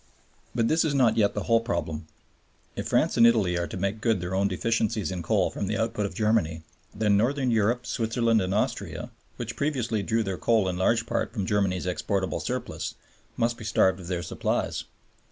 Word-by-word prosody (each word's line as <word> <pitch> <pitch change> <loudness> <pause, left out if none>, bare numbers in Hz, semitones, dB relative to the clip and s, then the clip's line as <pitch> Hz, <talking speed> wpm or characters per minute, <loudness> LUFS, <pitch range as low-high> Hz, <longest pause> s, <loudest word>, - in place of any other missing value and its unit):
But 115 - +2
this 160 +5 +3
is 150 -3 0
not 120 -5 +4
yet 105 -3 +2
the 105 - -2
whole 115 +2 +4
problem. 80 -9 -3 0.7
If - - -4
France - - +2
and 115 - +8
Italy 105 -7 +3
are 85 0 -1
to 75 - -6
make 100 +3 -2
good 115 -4 +2
their 90 +1 -4
own 100 +1 +2
deficiencies 110 -1 0
in 90 -2 -3
coal 80 - +1
from 100 - -3
the 105 - -1
output 110 -2 -1
of - - -11
Germany, 105 -8 +1 0.3
then 105 -1 +2
Northern 130 +3 +1
Europe, 115 +3 +1
Switzerland, 115 -1 +1
and 95 0 -2
Austria, 105 +3 -2 0.2
which - - -5
previously 125 -7 -1
drew 115 +2 0
their 95 -3 -4
coal 110 -4 +2
in 90 - -1
large 115 +5 +2
part - - -1
from 105 -5 -3
Germany's 95 -3 0
exportable 95 +1 -1
surplus, - - -4 0.4
must 115 0 +1
be - - -8
starved 95 -3 +2
of 90 - -9
their 90 -1 -2
supplies. - - -2
105 Hz, 195 wpm, -27 LUFS, 95-115 Hz, 0.7 s, and